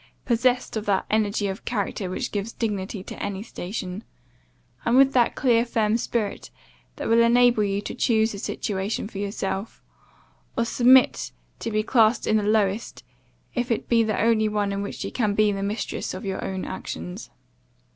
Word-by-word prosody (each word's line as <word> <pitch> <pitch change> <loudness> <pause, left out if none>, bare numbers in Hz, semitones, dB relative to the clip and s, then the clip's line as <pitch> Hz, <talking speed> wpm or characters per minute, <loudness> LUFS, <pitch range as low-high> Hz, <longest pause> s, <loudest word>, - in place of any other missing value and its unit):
possessed 245 +1 +1
of 220 -1 -3
that 195 -2 +1
energy 210 -1 +1
of 195 +1 -4
character 205 -4 -2
which 185 - -3
gives 205 +2 -3
dignity 205 -3 -3
to - - -9
any 200 0 -3
station; 185 -1 -6 0.8
and 240 +2 +3
with 270 0 +6
that 245 -2 +3
clear, 235 -3 +3
firm 225 -2 +1
spirit 230 -3 -2 0.5
that - - -4
will 230 +1 +5
enable 235 -1 +5
you 200 0 -1
to - - -6
choose 220 -1 +2
a 200 - -6
situation 200 +1 -3
for 200 - -8
yourself, 200 0 -4 0.7
or 235 - +2
submit 250 +2 +4 0.3
to - - -3
be 215 -1 0
classed 225 0 +3
in 215 - +3
the - - +1
lowest, 210 0 0 0.5
if 245 0 -1
it 230 - -1
be 235 -1 +4
the 220 -2 0
only 225 -1 +3
one 205 -1 0
in 200 0 -2
which 200 - -5
you - - -4
can 210 -5 0
be 215 0 +4
the 195 -1 -3
mistress 200 -1 -3
of 185 - -7
your 190 -1 -3
own 190 -1 -3
actions. 85 +3 -6
215 Hz, 175 wpm, -24 LUFS, 200-230 Hz, 0.8 s, with